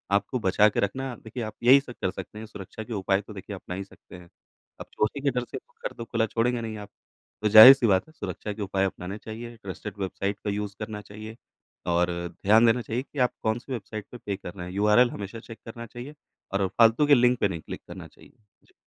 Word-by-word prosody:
आपको 125 +5 0
बचा 105 0 +4
के - - -2
रखना 130 +6 -2
देखिए, 115 +2 -6
आप 110 - -5
यही 130 +3 +8
सब 125 -3 -10
कर 95 - 0
सकते 105 - -8
हैं 110 - -7
सुरक्षा 105 0 -9
के 115 - -7
उपाय 95 -1 +1
तो 105 +1 -12
देखिए 100 +1 -7
अपना 90 -1 -7
ही 95 - -4
सकते 95 - -16
हैं। 90 -1 -13 0.5
अब - - -7
चोरी 110 +6 -1
के 140 0 +1
डर 125 -1 -1
से - - -4
घर 485 0 -8
तो 115 - -6
खुला 115 -1 0
छोड़ेंगे 120 +2 0
नहीं 110 -1 -5
आप। 105 -1 -9 0.5
तो 105 - +2
ज़ाहिर-सी 120 +4 +10
बात 95 -2 +2
है - - -17
सुरक्षा 105 -8 -5
के 105 - -8
उपाय 95 -1 0
अपनाने 95 +1 -5
चाहिए, 115 +2 -8
ट्रस्टेड 100 +2 -6
वेबसाइट 100 +1 -3
का 105 - -2
यूज़ 100 0 -3
करना 110 -1 -5
चाहिए 110 +2 -10 0.6
और 85 +1 +3 0.4
ध्यान 110 +3 +6
देना 120 +2 +3
चाहिए 120 +2 -3
कि 145 - -9
आप 125 -1 +3
कौन-सी 115 +4 -2
वेबसाइट 110 -2 -6
पे, 125 - -8
पे 100 -4 -4
कर 90 -2 -9
रहे 90 -3 -7
हैं? 90 - -8
यूआरएल 105 +5 +4
हमेशा 100 +3 -7
चेक 115 0 -12
करना 115 +1 -8
चाहिए 120 +6 -9 0.4
और 100 -1 +1
फ़ालतू 115 +8 +4
के 145 - +7
लिंक 125 -1 +3
पे - - +3
नहीं 85 -5 -5
क्लिक - - -8
करना - - -9
चाहिए। - - -20 0.3
जी। - - -28
110 Hz, 235 wpm, -26 LUFS, 100-120 Hz, 0.6 s, ज़ाहिर-सी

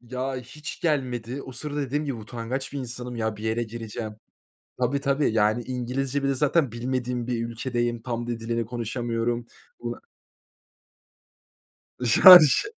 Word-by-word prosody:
Ya 130 +2 -4
hiç 135 +4 -8
gelmedi. 130 -4 -1
O 130 - -9
sırada 145 +4 -4
dediğim 145 +2 -2
gibi 140 -3 -2
utangaç 120 +4 -5
bir 140 - -4
insanım, 125 -1 -6
ya 110 -2 -2
bir 105 - -10
yere 110 +2 0
gireceğim 110 -1 -6 0.7
Tabii, 140 +3 +1
tabii, 140 -2 +1
yani 110 +2 +2
İngilizce, 130 +3 -2
bir - - +1
de - - +2
zaten 145 0 +2
bilmediğim 125 0 -3
bir 115 -2 -1
ülkedeyim. 120 0 -2
Tam 120 -1 -4
da 120 - -2
dilini 115 0 -2
konuşamıyorum. 120 0 -2 0.3
Bu 120 0 -5 2.1
Şarj. 155 - +9
120 Hz, 140 wpm, -25 LUFS, 115-135 Hz, 2.1 s, Şarj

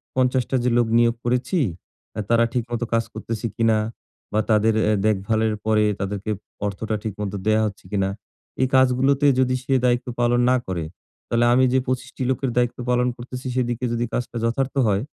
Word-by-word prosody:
৫০ 130 0 +2
টা - - 0
যে 125 - +2
লোক 120 -1 +3
নিয়োগ 120 0 +3
করেছি, 125 +8 0 0.6
আ - - -2
তারা 115 0 +4
ঠিকমত 120 -1 -2
কাজ 115 0 +3
করতেছে 115 0 -5
কিনা? 115 -1 +3 0.6
বা 105 - +2
তাদের 110 +1 +4
এ্যা 105 0 +3
দেখভালের 110 +2 +1
পরে 110 -1 +3 0.2
তাদেরকে 100 +1 -3 0.4
অর্থটা 105 +2 -3
ঠিকমত 105 -2 -4 0.2
দেয়া 110 0 +4
হচ্ছে 100 -3 -9
কিনা? 95 -2 +1 0.5
এ - - +5
কাজগুলোতে 130 +2 +4
যদি 130 -1 +2
সে 135 - -1
দায়িত্ব 120 0 +1
পালন 120 0 +3
না - - +4
করে, 90 -3 -2 0.4
তাহলে 120 0 +2
আমি 130 +1 +4
যে 130 - +4
২৫ 130 0 -2
টি - - -2
লোকের 130 0 0
দায়িত্ব 120 -1 +1
পালন 125 0 +2
করতেছি, 125 +2 -7
সেদিকে 125 -1 -1
যদি 120 +1 0
কাজটা 125 -1 -3
যথার্থ 130 +4 -1
হয়, 100 +1 +1
120 Hz, 180 wpm, -23 LUFS, 110-125 Hz, 0.6 s, এ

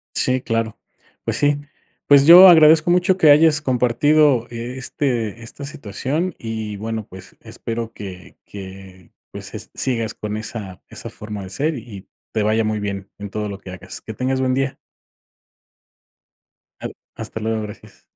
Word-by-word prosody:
Sí, 130 0 +1
claro. 115 -2 -2 0.5
Pues - - -2
sí. 145 0 +2 0.5
Pues 140 -1 +7
yo 180 +4 +11
agradezco 160 0 +6
mucho 180 +1 +3
que 155 -5 +6
hayas 155 +1 +5
compartido 130 0 +3
e 120 +2 -6
este 120 -4 -2
esta 120 +5 -9
situación 145 - -3
y 110 -2 -5
bueno 110 +1 -5
pues 95 0 -13
espero 115 0 -6
que 95 -3 -10
que 95 -2 -11 0.2
pues - - -7
es - - -6
sigas 115 -4 0
con 105 0 -5
esa 105 -4 -6
esa - - -7
forma 105 -1 -8
de 95 - -9
ser 145 - -1
y 105 -5 -10 0.3
te 110 - +1
vaya 110 +1 +2
muy 110 -1 -1
bien 100 -1 -4
en 100 0 -7
todo 105 +1 -3
lo 100 -1 -7
que 95 -2 -10
hagas. 95 +1 -7
Que 110 - -8
tengas 130 +3 -1
buen 130 -1 +1
día. 135 +1 -1 2.1
Claro, - - -6 0.2
hasta - - -6
luego, 110 0 -2
gracias. 105 -1 -11
115 Hz, 160 wpm, -20 LUFS, 105-140 Hz, 2.1 s, yo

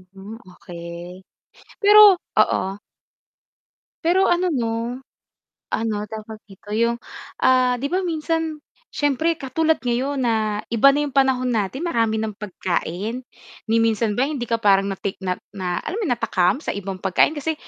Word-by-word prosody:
Mm, 205 +4 -9 0.2
okay. 170 +1 -9 0.6
Pero 415 -3 +8 0.2
oo 195 +2 +1 1.2
Pero 370 +3 +3
ano 360 0 +2
no, 235 -3 -2 0.8
ano, 220 -1 0
tawag 220 0 -8
dito 195 +1 -15
yung, 235 +2 +1 0.5
ah, 255 -1 +4
'di - - -2
ba, 370 +2 +1
minsan 325 -1 -2 0.4
siyempre 295 +3 +1
katulad 315 +4 0
ngayon 260 +3 -1
na 220 -3 0
iba 230 +4 +5
na 290 +2 0
yung 280 - -7
panahon 260 -2 +2
natin, 225 - -2
marami 225 -8 +1
ng 220 -1 -3
pagkain, 195 +3 -3 0.5
ni 225 - +3
minsan 225 -1 +1
ba 260 - +3
hindi 285 -5 -3
ka 230 - +2
parang 195 -1 +3
natik 195 0 -4
na 185 -1 -1 0.2
na 180 -2 -2
alam 405 - -3
mo - - -1
yun 245 - +2
natakam 210 -4 +1
sa - - -2
ibang 195 -1 -5
pagkain. 190 - +3
Kasi 320 +2 -1
230 Hz, 150 wpm, -22 LUFS, 205-290 Hz, 1.2 s, Pero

